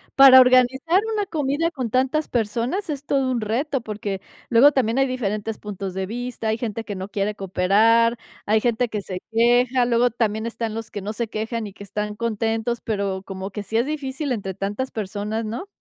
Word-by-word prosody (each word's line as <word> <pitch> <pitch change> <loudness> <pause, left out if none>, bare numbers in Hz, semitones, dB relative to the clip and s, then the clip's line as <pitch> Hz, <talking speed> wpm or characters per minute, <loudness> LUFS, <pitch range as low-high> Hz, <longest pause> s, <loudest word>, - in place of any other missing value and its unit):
Para 270 -1 +10
organizar 255 +8 +4
una 420 -2 0
comida 310 0 -1
con 260 -7 -3
tantas 265 +6 +1
personas, 240 - -1
es 285 -1 -5
todo 270 -2 +1
un 240 -2 -1
reto, 255 +6 -1
porque 210 -3 -4 0.3
luego 250 +5 +7
también 255 -3 +1
hay 270 - +3
diferentes 220 -4 -3
puntos 195 -2 -6
de 190 0 -2
vista, 240 +1 -4
hay 220 - 0
gente 225 -1 -3
que 210 - -6
no 190 +1 -6
quiere 205 +1 -1
cooperar, 215 +5 +3 0.3
hay 215 +1 +3
gente 240 +1 +1
que 210 -2 -3
se 185 -2 -6
queja, 245 +2 +3
luego 240 0 +2
también 220 -1 -1
están 230 -1 -3
los 225 -1 -6
que 205 - -5
no 205 +3 -4
se 230 0 -3
quejan 220 +1 -3
y 200 - -11
que 200 - -11
están 210 +1 -4
contentos. 225 +1 -1
Pero 200 -3 -2
como 190 0 -6
que 205 +1 -5
sí 220 +2 -2
es 235 +3 +1
difícil 285 -1 -3
entre 200 -5 -3
tantas 205 +7 -3
personas, 215 +1 -3
¿no? 235 - -5
230 Hz, 195 wpm, -23 LUFS, 210-255 Hz, 0.3 s, Para